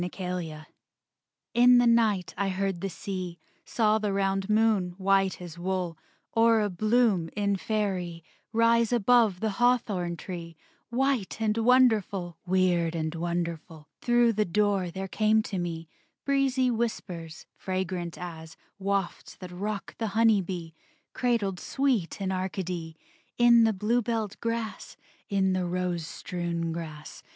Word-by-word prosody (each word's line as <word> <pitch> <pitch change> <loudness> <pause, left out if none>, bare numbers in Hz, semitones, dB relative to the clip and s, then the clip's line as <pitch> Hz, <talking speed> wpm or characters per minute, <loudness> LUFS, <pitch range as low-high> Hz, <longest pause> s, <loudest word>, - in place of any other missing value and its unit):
THE 180 - -2
CHANGELING 180 -5 -5 0.9
In 245 +1 +7
the 245 - +5
night 225 -5 +2
I 195 +1 -1
heard 190 -2 -2
the 195 - -2
sea; 185 -2 -5 0.3
Saw 215 -2 +2
the 210 -2 -1
round 195 0 0
moon, 210 -5 +2
white 195 0 +2
as 175 -2 -9
wool, 180 -2 -2 0.4
Or 225 -1 +4
a 205 -1 0
bloom 215 -3 +2
in 200 -1 +1
Faerie, 185 -5 -2 0.3
Rise 230 0 +3
above 230 -4 +3
the 220 -1 0
hawthorn 205 -8 +1
tree, 170 -2 -7 0.3
White 250 -4 0
and 215 -1 +1
wonderful, 215 -8 +3
Weird 175 -2 +2
and 160 -1 -2
wonderful. 170 -2 -4
Through 240 -1 +3
the 215 0 +2
door 200 -1 +1
there 190 +3 -5
came 215 +2 +2
to 195 -4 -4
me 165 -2 -4 0.4
Breezy 270 -2 +2
whispers, 180 -8 -4
fragrant 185 -2 -3
as 160 -2 -8 0.2
Wafts 195 -2 -2
that 185 -1 -10
rock 200 +1 -4
the 225 - -1
honey 225 -3 +5
bee, 175 -3 -6 0.4
Cradled 220 -7 0
sweet 255 -12 -1
in 190 -1 -2
Arcady, 180 -3 -4 0.4
In 235 -1 +6
the 225 - +3
bluebelled 220 0 -1
grass, 230 -1 -4 0.3
In 190 -2 +2
the 185 -1 0
rose 175 -2 -2
strewn 170 -2 -3
grass. 155 -2 -7
195 Hz, 135 wpm, -28 LUFS, 175-225 Hz, 0.9 s, In